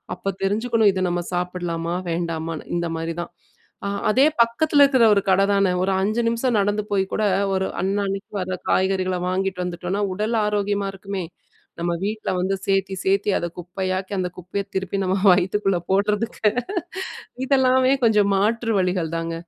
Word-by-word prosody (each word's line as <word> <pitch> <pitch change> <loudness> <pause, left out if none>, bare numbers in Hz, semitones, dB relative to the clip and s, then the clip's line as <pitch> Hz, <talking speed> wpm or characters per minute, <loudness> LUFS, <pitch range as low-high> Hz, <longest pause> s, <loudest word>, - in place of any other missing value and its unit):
அப்ப 195 +1 -3
தெரிஞ்சுக்கணும் 220 +1 +2
இத 185 -1 -1
நம்ம 175 0 -1
சாப்பிடலாமா? 175 -1 -2 0.2
வேண்டாமான்னு? 165 -1 -3
இந்த 170 -1 -2
மாரி 165 0 -3
தான். 175 - -7 0.6
அ - - -1 0.2
அதே 265 +6 +5 0.2
பக்கத்தில 285 +5 +3
இருக்கிற 260 -5 +4
ஒரு 200 - +2
கட 190 +1 +4
தானே. 195 -2 +3
ஒரு 195 - +1
5 215 +5 0
நிமிஷம் 235 -1 +1
நடந்து 205 +1 0
போய் 195 -1 +2
கூட, 215 - 0 0.3
ஒரு 190 0 0
அன்னன்னைக்கு 195 +1 -2
வர 185 0 -3
காய்கறிகள 185 -1 +1
வாங்கிட்டு 185 -1 -1
வந்துட்டோம்ன்னா, 180 +3 -3
உடல் 215 +4 -1
ஆரோக்கியமா 205 -1 0
இருக்குமே! 195 -1 -5 0.6
நம்ம 170 0 0
வீட்ல 215 +1 -2
வந்து 190 +2 0
சேத்தி 195 0 +1
சேத்தி 195 +2 +2
அத 175 - -2
குப்பையாக்கி, 185 +2 -3
அந்த 180 - 0
குப்பைய 180 +3 -4
திருப்பி 190 +1 -2
நம்ம 185 +1 +1 0.2
வயித்துக்குள்ள 190 +1 +1
போடறதுக்கு 210 +2 +1 1.0
இதெல்லாமே 260 -1 +4
கொஞ்சம் 210 -2 +4
மாற்று 225 +3 +1
வழிகள் 180 -3 0
தாங்க! 165 0 -3
195 Hz, 150 wpm, -22 LUFS, 180-210 Hz, 1.0 s, அதே